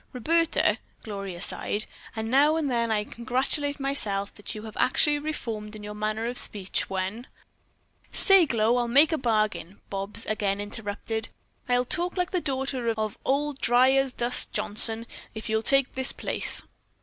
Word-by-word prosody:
"Roberta," 330 +6 +2 0.2
Gloria 195 -4 -6
sighed, 205 +3 -1 0.3
"now 270 +8 +3
and 305 -4 -1
then 235 -1 +1
I 210 -1 +1
congratulate 265 +6 -2
myself 210 -8 -1
that 205 - -6
you 215 - -7
have 220 -1 -9
actually 295 +3 +3
reformed 225 -8 -5
in 210 - -9
your 210 0 -6
manner 215 +1 -2
of 245 +1 0
speech, 195 -2 -1
when 195 +6 -3 0.4
" - - -39
"Say, 390 -4 +5
Glow, 230 0 +2
I'll 240 -1 0
make 285 +7 +5
a 320 - +1
bargain," 215 -6 -1
Bobs 195 +3 -3
again 205 -2 -1
interrupted. 215 +1 -5 0.4
"I'll 245 0 +2
talk 350 +8 -1
like 360 -1 0
the 360 - 0
daughter 265 -4 -1
of 215 -1 -2
Old 280 +1 0
dry 245 +2 +5
as 270 -1 +2
dust 245 0 +3
Johnson, 225 +2 +1 0.3
if 220 +1 -5
you'll 220 0 +1
take 275 +2 +3
this 260 0 0
place. - - -1
235 Hz, 160 wpm, -26 LUFS, 215-275 Hz, 0.4 s, Say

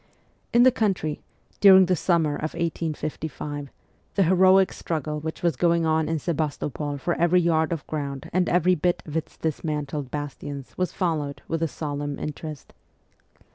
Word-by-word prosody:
In 240 0 +6
the 255 - +7
country, 190 -10 -1 0.4
during 190 -2 +8
the 180 0 +2
summer 165 -3 +1
of 155 +2 -4
1855, 155 -3 -4 0.5
the 195 - +4
heroic 185 +2 +5
struggle 155 -2 -3
which 160 +3 -6
was 170 -4 +2
going 170 +3 +2
on 160 0 +1
in 165 - 0
Sebastopol 150 -2 -2
for 170 +5 -1
every 175 +2 +3
yard 160 -2 +2
of 165 -3 -3
ground 140 -3 -4
and 180 0 +2
every 180 +1 +3
bit 175 +1 0
of 150 - -8
its 160 0 -3
dismantled 150 -3 -3
bastions 145 -1 -6
was 185 -1 -1
followed 155 -6 -2
with 165 0 -2
a 165 - +2
solemn 145 0 -4
interest. 150 -1 -7
160 Hz, 155 wpm, -25 LUFS, 150-175 Hz, 0.5 s, during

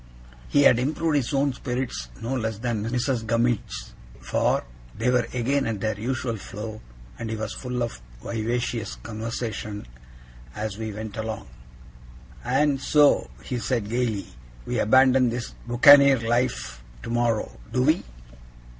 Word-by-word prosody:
He 145 - +4
had 120 -3 +6
improved 155 +4 0
his 130 -4 -1
own 140 -1 +2
spirits, 125 - -4
no 120 +4 -2
less 110 -4 -2
than 115 -1 -2
Mrs. 125 0 0
Gummidge's, 115 0 -1 0.3
for - - +1 0.3
they 120 +3 +2
were 125 -1 +2
again 135 +3 0
at 110 -3 -2
their 110 0 -2
usual 120 0 -2
flow, 105 +2 -7 0.4
and 115 - -4
he 110 - -2
was 110 0 -4
full 125 -1 -3
of 115 - -5 0.2
vivacious 115 - -2
conversation 110 - -5 0.7
as 105 0 -4
we 110 -1 -3
went 110 +1 -7
along. 110 -5 -4 1.0
'And 135 +2 +2
so,' 145 0 +4
he 125 - -3
said, 115 -4 -1
gaily, 115 -4 -1 0.4
'we - - -1
abandon 130 +2 +5
this 120 0 -4
buccaneer 140 +3 +8
life 120 - -1 0.2
tomorrow, 115 - -1
do 125 - +2
we? 155 +5 +3
120 Hz, 135 wpm, -25 LUFS, 110-130 Hz, 1.0 s, buccaneer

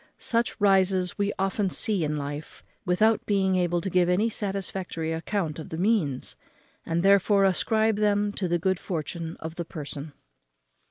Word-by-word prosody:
Such 230 -1 0
rises 190 -2 +2
we 200 0 +1
often 195 +1 0
see 200 -2 0
in 150 0 -1
life, 145 +1 -6 0.2
without 215 +5 +3
being 195 -2 +2
able 175 -1 +1
to 190 - -3
give 180 0 +3
any 200 +6 +2
satisfactory 190 -5 -3
account 165 -1 -2
of 160 - -8
the 160 - -5
means, 175 - 0 0.5
and 165 +1 0
therefore 200 +1 +4
ascribe 220 +3 +2
them 205 -1 +2
to 190 - -2
the 175 0 +1
good 185 +1 0
fortune 165 -1 -4
of 160 +1 -7
the 170 - -3
person. 145 -1 -7
185 Hz, 160 wpm, -26 LUFS, 165-205 Hz, 0.5 s, therefore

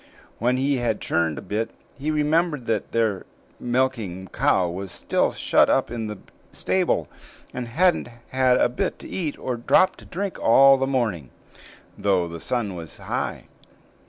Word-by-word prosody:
When 125 +3 +2
he 135 +1 +1
had 120 -3 -1
churned 80 -3 0
a - - -6
bit, 105 +4 -2 0.3
he 145 +3 -4
remembered 155 -2 +1
that 110 -3 -1
their 110 -4 0 0.4
milking 120 -8 -1
cow 90 -2 +2
was 95 +2 -5
still - - 0
shut - - +3
up - - +2
in 115 -2 -3
the 105 -1 -6 0.3
stable, 185 -2 0 0.5
and 125 -1 -4
hadn't 170 +3 +2 0.2
had 130 -1 +3
a - - +4
bit 120 0 -2
to - - -11
eat 160 -6 -3
or 130 - -3
a - - -4
drop 185 +9 +3
to - - -14
drink 195 +2 -4
all 135 +4 +6
the 135 0 0
morning, 110 - -1 0.7
though 95 -4 +2
the 85 0 -7
sun 110 0 -2
was 85 -4 -8
high. - - -3
120 Hz, 165 wpm, -24 LUFS, 100-135 Hz, 0.7 s, all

